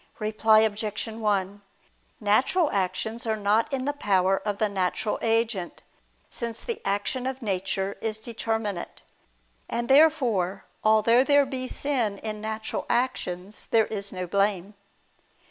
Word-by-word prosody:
Reply 215 0 +4
Obj. 215 -1 -1
1: 205 -3 -1 0.6
Natural 255 - +2
actions 210 +5 -2
are 220 -1 0
not 210 +4 +1
in 265 -1 -2
the 290 - 0
power 195 -8 +2
of 205 -1 -2
the 215 - +2
natural 200 +2 -1
agent: 225 -5 -1 0.5
since 235 -2 -5
the 465 -3 -4
action 205 +6 -1
of 265 -1 -4
nature 195 0 -1
is 220 -1 -1
determinate. 220 -4 -4 0.7
And, 235 0 -2
therefore, 255 - +3 0.2
although 220 +3 +5
there 285 0 +4
be 260 -1 -4
sin 250 -8 -1
in 215 0 -5
natural 220 0 -4
actions, 210 -6 -2
there 225 -1 +4
is 200 -2 -5
no 185 -1 -4
blame. 200 +1 0
215 Hz, 130 wpm, -26 LUFS, 200-235 Hz, 0.7 s, although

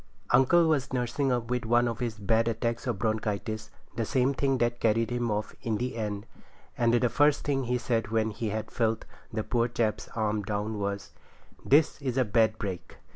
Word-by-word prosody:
Uncle 145 +7 +5
was 145 -5 +1
nursing 130 +2 0
up 120 -1 -1
with 125 -1 0
one 120 +2 +3
of 115 -2 -3
his 115 -3 -3
bad 110 +2 +2
attacks 115 0 -2
of - - -1
bronchitis, 110 +1 -2 0.3
the 115 - +1
same 130 +3 +1
thing 135 -1 +1
that 120 0 0
carried 115 +1 +2
him 120 -1 -1
off 105 0 -2
in 110 -2 -1
the 125 +1 -3
end, 105 -2 -3 0.5
and 120 0 +3
the 125 +1 +3
first 145 +4 +3
thing 135 -2 0
he 125 +1 +1
said 115 -2 -1
when 110 0 0
he'd 110 0 -3
felt 115 -2 0 0.3
the 110 -1 -2
poor 120 +1 +1
chap's 115 -2 -1
arm 110 -2 0
down 105 +1 -3
was— 100 0 -3 0.5
'This 145 +2 +3
is 130 -2 -2
a 130 - +3
bad 110 0 +2
break. 95 -5 -6
115 Hz, 190 wpm, -28 LUFS, 110-125 Hz, 0.5 s, Uncle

